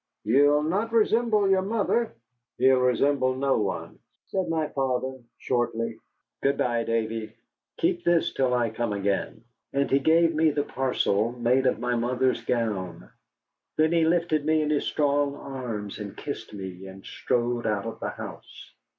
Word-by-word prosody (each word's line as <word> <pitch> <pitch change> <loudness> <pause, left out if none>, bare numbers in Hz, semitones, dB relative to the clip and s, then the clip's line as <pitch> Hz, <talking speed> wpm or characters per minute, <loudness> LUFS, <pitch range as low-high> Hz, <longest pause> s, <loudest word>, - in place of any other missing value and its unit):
"You'll 145 +6 +4
not 200 +9 -1
resemble 225 -2 +3
your 190 -1 +3
mother." 225 - 0 0.4
"He'll 130 0 +5
resemble 130 +1 +2
no 135 -1 +1
one," 100 - -4 0.3
said 190 -2 -1
my 160 -2 0
father, 130 -1 -2 0.2
shortly. 120 -2 -1 0.4
"Good 140 +1 +1
by, 120 -1 +1
Davy. 110 -1 -2 0.4
Keep 345 +1 0
this 170 -1 +2
till 130 -2 +1
I 120 -2 +1
come 115 -1 -2
again." 100 +2 -2 0.3
And 140 0 0
he 135 - +5
gave 165 +3 +4
me 160 +1 +3
the 145 -1 0
parcel 120 -5 0
made 125 +2 +2
of 125 - +2
my 125 +2 -1
mother's 125 +2 0
gown. 100 -8 -2 0.7
Then 155 +1 +3
he 170 -1 +3
lifted 165 -2 +1
me 155 0 +2
in 150 - -1
his 145 - +1
strong 145 -1 +1
arms 120 -8 -6
and 100 -2 -7
kissed 140 -6 -6
me, 95 -2 -7
and 95 0 -12
strode 120 0 -1
out 105 -1 -1
of 115 - -6
the - - -3
house. - - -10
130 Hz, 160 wpm, -26 LUFS, 115-155 Hz, 0.7 s, He'll